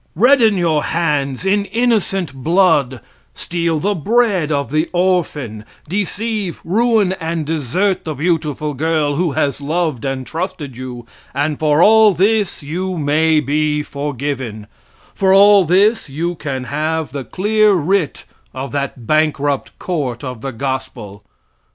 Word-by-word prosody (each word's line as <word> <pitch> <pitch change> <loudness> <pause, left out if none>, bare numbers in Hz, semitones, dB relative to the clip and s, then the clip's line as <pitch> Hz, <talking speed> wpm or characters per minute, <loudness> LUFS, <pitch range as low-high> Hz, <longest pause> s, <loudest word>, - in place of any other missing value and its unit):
Redden 230 - +4
your 165 -4 +1
hands 150 -3 -1
in 200 +1 +2
innocent 205 - 0
blood; 140 - +2 0.3
steal 170 -2 -1
the 205 +6 0
bread 200 -2 +1
of 140 -2 -1
the 155 +2 0
orphan, 160 - -1 0.2
deceive, 205 +1 -3
ruin 215 0 +2
and 165 -1 -2
desert 165 - -1
the 155 -2 -4
beautiful 150 -1 -1
girl 150 0 0
who 170 -3 0
has 145 -1 -1
loved 155 -3 -1
and 135 -1 -3
trusted 160 -5 -5
you, 125 -1 -8 0.3
and 145 +1 -1
for 155 +1 +3
all 220 -1 +6
this 200 -2 +1
you 180 +5 -3
may 155 +1 +2
be 150 +1 0
forgiven; 135 -6 -4 0.5
for 190 0 +3
all 200 -1 +7
this 195 +2 +2
you 165 +6 -2
can 140 -5 -5
have 155 +4 -2
the 140 -2 -5
clear 210 - +2
writ 185 -1 0 0.3
of 135 +1 -5
that 140 -4 -4
bankrupt 145 -1 0
court 140 -9 -3
of 125 -4 -6
the 135 - -4
gospel. 130 -6 -5
155 Hz, 135 wpm, -17 LUFS, 140-190 Hz, 0.5 s, all